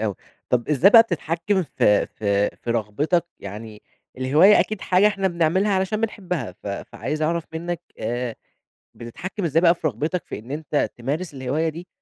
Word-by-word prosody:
أوي، 105 -3 -1 0.3
طب 120 -1 0
إزاي 150 +6 +5
بقى 225 +1 +10
بتتحكم 175 0 -1
في 105 -9 +2
في 100 -1 0
في 120 - -5
رغبتَك؟ 140 - 0
يعني 105 +2 -9 0.4
الهواية 150 +11 +6
أكيد 215 -3 -2
حاجة 185 +3 +3
إحنا 195 -2 +1
بنعملها، 175 +4 +1
علشان 190 +3 0
بنحبها، 180 - -3
ف 100 - -16
فعايز 150 +9 -4
أعرف 165 +1 0
منَّك 170 +1 -4 0.2
آآ 120 +1 -3 0.6
بتتحكم 185 - -7
إزاي 160 +1 +2
بقى 170 -1 +5
في 165 - -1
رغبتَك 155 - -2
في - - -6
إن 115 +5 -11
أنت 150 0 -1
تمارس 145 +8 -3
الهواية 140 +5 -1
دي، 170 +3 -9
155 Hz, 165 wpm, -23 LUFS, 120-180 Hz, 0.6 s, بقى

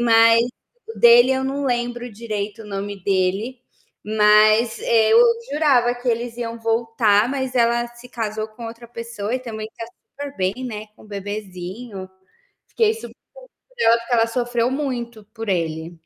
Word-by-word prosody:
mas 230 -1 +6 0.5
o 450 - -8
dele 240 +2 +7
eu 265 0 -1
não 275 +2 -2
lembro 240 0 -2
direito 215 -1 -5
o - - -12
nome 200 -1 -5
dele. 195 +6 0 0.4
Mas, 215 +2 +4
eh, 220 -1 +3
eu 225 - +7 0.3
jurava 265 -5 +3
que 245 +1 -5
eles 235 0 -1
iam 230 -1 -4
voltar, 225 -1 +2
mas 265 -2 -3
ela 240 0 +2
se 240 +1 -15
casou 220 -2 -4
com 220 +2 -11
outra 230 +1 -9
pessoa 230 -1 -5
e - - 0
também 220 -4 -7
tá 230 - -5 0.3
super 285 0 -7
bem, 185 +1 0
né, 215 -3 -6
com - - -18
o - - -16
bebezinho. 200 0 -7 0.6
Fiquei 440 -1 +2
super 455 - -10 0.6
curiosa, 470 - +3
porque 235 +1 -4
ela 230 -1 +4
sofreu 240 0 0
muito 245 -5 -4
por 225 -2 -6
ele. 165 -2 -2
230 Hz, 160 wpm, -21 LUFS, 210-245 Hz, 0.6 s, dele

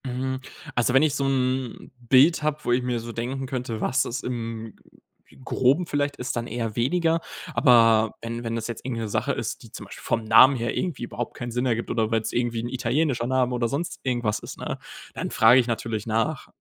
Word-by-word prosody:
Hm. 130 +1 -2 0.4
Also 120 +1 +2
wenn 135 +2 +5
ich 150 -2 +2
so 140 - 0
’n 130 -2 -1 0.2
Bild 145 +6 +6
habe, 150 0 0
wo - - 0
ich 125 +1 +3
mir 125 -1 -1
so 115 +1 -7
denken 125 +4 -4
könnte, 125 -4 -4
was 130 +1 +1
es 120 - -4
im 115 -3 -5 0.7
Groben 135 +8 +2
vielleicht 145 -2 -1
ist, 130 +1 -3
dann 120 0 -3
eher 115 -3 -3
weniger. 165 +6 +1 0.3
Aber 115 -4 +5
wenn 115 +1 -5
wenn 115 0 -3
das 115 -1 -3
jetzt 115 - -6
irgend 120 -2 -3
'ne 110 - -3
Sache - - 0
ist, - - -4
die - - -14
zum - - -8
Beispiel - - -11
vom 115 - 0
Namen 120 +5 +7
her 115 -1 -2
irgendwie 170 -9 -2
überhaupt 120 0 -5
keinen 120 0 -5
Sinn 125 +2 -1
ergibt, 115 -1 -1
oder 110 -2 +1
weil’s 110 -1 0
irgendwie 120 -1 0
'n 120 - -4
italienischer 130 0 0
Name 130 -1 +1
oder 120 -1 0
sonst 145 +8 -3
irgendwas 120 -5 0
ist, - - -9
ne, - - -4 0.4
dann - - -4
frage 115 +4 +6
ich 125 - +1
natürlich 115 -2 -3
nach, 115 +7 -1
120 Hz, 215 wpm, -25 LUFS, 115-130 Hz, 0.7 s, Namen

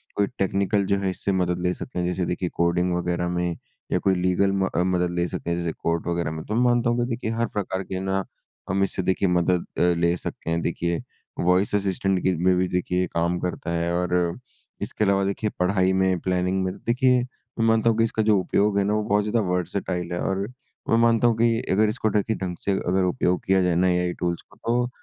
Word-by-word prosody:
कोई 100 -1 +2
टेक्निकल 100 +1 +1
जो 100 - +4
है 95 -1 0
इससे 100 +1 -2
मदद 90 -2 0
ले 90 - +1
सकते 90 -3 -6
हैं 90 - 0
जैसे 90 0 -1
देखिए 90 +1 -2
कोडिंग 90 +1 +1
वगैरह 90 0 -1
में, 90 -1 -1 0.3
या - - +2
कोई 95 -1 +2
लीगल 90 +2 +2
म 95 -1 +1
अ, 90 - +3
मदद 90 -1 +1
ले 85 0 +1
सकते 85 - -5
हैं 85 - 0
जैसे 85 -1 -1
कोर्ट 85 +1 -2
वगैरह 85 -2 -1
में। 80 0 -5
तो 105 - -3
मानता 120 0 +3
हूँ 120 +1 +1
कि 120 - +1
देखिए 115 -2 -2
हर 115 - +2
प्रकार 95 -2 -3
के 95 0 -4
ना 95 0 -1 0.5
हम 95 0 +2
इससे 95 - -1
देखिए 95 +1 +1
मदद 90 0 +2
अ, - - +2 0.2
ले 85 0 +2
सकते 85 - -6
हैं, 85 0 0
देखिए 85 0 -1 0.4
वॉइस 90 +3 +2
असिस्टेंट 95 -1 0
की 95 -1 +2
में 90 +2 +2
भी 90 +1 +1
देखिए 90 0 0
काम 85 +1 0
करता 90 -1 -3
है 85 0 0
और 90 0 0 0.7
इसके - - -2
अलावा 100 -1 +3
देखिए 100 +2 -1
पढ़ाई 95 0 +2
में, 95 -1 +2
प्लानिंग 90 +1 0
में 90 - -2
देखिए 125 +1 +2 0.4
मैं 115 - +3
मानता 115 0 +3
हूँ 115 - +1
कि 115 - +4
इसका 110 -1 0
जो 105 -1 +4
उपयोग 100 +2 +1
है 100 - +3
ना 105 - 0
वो 105 0 +1
बहुत 105 0 +2
ज़्यादा 105 +3 0
वर्सेटाइल 90 0 -2
है 85 - -2
और 95 0 -1 0.5
मैं 115 - +4
मानता 115 0 +4
हूँ 115 - +3
कि 115 0 +3
अगर 105 +3 +3
इसको 110 0 0
ढकी 105 +2 0
ढंग 90 -2 -4
से 100 - 0
अगर 95 -1 +1
उपयोग 90 0 0
किया 95 0 +3
जाए 90 -2 +2
ना 90 +2 +3
एआई 90 0 +1
टूल्स 85 -1 -1
को, - - -23
तो 120 +1 0
95 Hz, 230 wpm, -24 LUFS, 90-100 Hz, 0.7 s, जो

